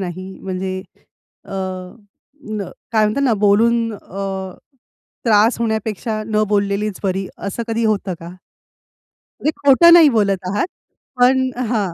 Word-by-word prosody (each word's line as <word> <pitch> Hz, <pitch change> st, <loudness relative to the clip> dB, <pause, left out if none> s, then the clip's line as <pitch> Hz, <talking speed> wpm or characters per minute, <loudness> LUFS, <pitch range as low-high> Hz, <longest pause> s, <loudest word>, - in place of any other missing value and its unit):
नाही 185 Hz, +1 st, -6 dB
म्हणजे 185 Hz, 0 st, -4 dB, 0.7 s
अ, -, -, -11 dB, 1.4 s
काय 215 Hz, -1 st, +4 dB
म्हणतात 215 Hz, +7 st, 0 dB
ना, 255 Hz, -, +3 dB
बोलून 225 Hz, +3 st, +3 dB
अ, 195 Hz, -1 st, -5 dB, 0.7 s
त्रास 220 Hz, +1 st, +4 dB
होण्यापेक्षा 220 Hz, -1 st, -2 dB
न 215 Hz, -1 st, +1 dB
बोललेलीच 200 Hz, 0 st, 0 dB
बरी. 190 Hz, 0 st, -1 dB
असं 200 Hz, +4 st, -4 dB
कधी 225 Hz, 0 st, 0 dB
होतं 200 Hz, -3 st, 0 dB
का? 170 Hz, +2 st, -9 dB, 1.1 s
म्हणजे 305 Hz, -, +1 dB
खोटं 285 Hz, +5 st, +7 dB
नाही 325 Hz, -4 st, +8 dB
बोलत 195 Hz, -3 st, +1 dB
आहात, 205 Hz, -, 0 dB, 0.5 s
पण 260 Hz, +1 st, +4 dB, 0.2 s
हां. 205 Hz, -7 st, -1 dB
210 Hz, 120 wpm, -19 LUFS, 195-230 Hz, 1.4 s, नाही